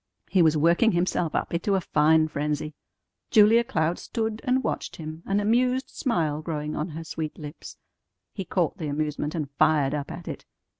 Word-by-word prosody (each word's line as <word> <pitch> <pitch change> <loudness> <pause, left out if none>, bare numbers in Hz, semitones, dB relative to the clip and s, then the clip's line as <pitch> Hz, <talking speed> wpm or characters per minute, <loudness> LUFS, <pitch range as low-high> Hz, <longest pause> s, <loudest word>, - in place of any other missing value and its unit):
He 190 -1 +4
was 160 -2 +4
working 170 +9 +4
himself 175 -2 0
up - - -2
into 185 +4 +1
a - - +2
fine 155 0 +3
frenzy. 150 +1 -2 0.6
Julia 220 +2 +6
Cloud 165 -5 -1
stood 220 -2 -3
and 260 +1 +2
watched - - -3
him, 155 0 -7
an 195 +1 +1
amused 250 +5 +1
smile 160 - -1
growing 150 -2 -4
on 150 - -2
her 165 -1 -7
sweet 155 -1 -5
lips. 150 0 -9 0.6
He 195 - -4
caught 175 -2 -1
the 155 - -3
amusement, 150 +1 -2
and 150 -4 -3
fired 145 -3 +3
up 145 -1 -3
at 170 0 -8
it. - - -6
160 Hz, 180 wpm, -26 LUFS, 150-200 Hz, 0.6 s, Julia